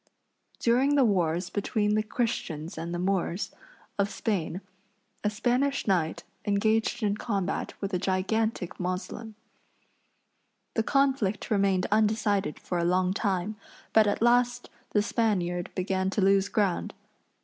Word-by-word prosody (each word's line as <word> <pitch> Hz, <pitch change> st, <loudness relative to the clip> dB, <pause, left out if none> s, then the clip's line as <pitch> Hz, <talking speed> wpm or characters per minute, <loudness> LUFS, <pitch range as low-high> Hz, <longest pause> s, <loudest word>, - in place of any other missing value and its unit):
During 260 Hz, +5 st, +3 dB
the 275 Hz, -3 st, +5 dB
wars 180 Hz, -3 st, +1 dB
between 210 Hz, +1 st, 0 dB
the 215 Hz, -, +3 dB
Christians 215 Hz, -8 st, -3 dB
and 165 Hz, +1 st, -5 dB
the 175 Hz, -, -2 dB
Moors, 185 Hz, 0 st, -1 dB, 0.5 s
of 200 Hz, 0 st, +2 dB
Spain, 190 Hz, -5 st, -2 dB, 0.6 s
a 210 Hz, -, +2 dB
Spanish 250 Hz, +6 st, 0 dB
knight 170 Hz, -4 st, 0 dB, 0.2 s
engaged 220 Hz, +3 st, +1 dB
in 205 Hz, -1 st, +2 dB
combat 195 Hz, -5 st, -2 dB
with 195 Hz, 0 st, -4 dB
a 180 Hz, -, +1 dB
gigantic 195 Hz, +1 st, -1 dB
Moslem. 190 Hz, +5 st, -4 dB, 1.4 s
The 225 Hz, -, +2 dB
conflict 265 Hz, -6 st, +1 dB
remained 195 Hz, -3 st, +2 dB
undecided 210 Hz, -4 st, +2 dB
for 175 Hz, -, -3 dB
a -, -, +1 dB
long 180 Hz, +1 st, +2 dB
time, 200 Hz, 0 st, -1 dB, 0.4 s
but 220 Hz, -1 st, +6 dB
at 205 Hz, +2 st, 0 dB
last 245 Hz, 0 st, +2 dB, 0.2 s
the 210 Hz, -, +2 dB
Spaniard 180 Hz, -6 st, 0 dB
began 190 Hz, 0 st, 0 dB
to 200 Hz, -, -1 dB
lose 195 Hz, +1 st, +4 dB
ground. 200 Hz, -5 st, 0 dB
200 Hz, 130 wpm, -28 LUFS, 185-220 Hz, 1.4 s, but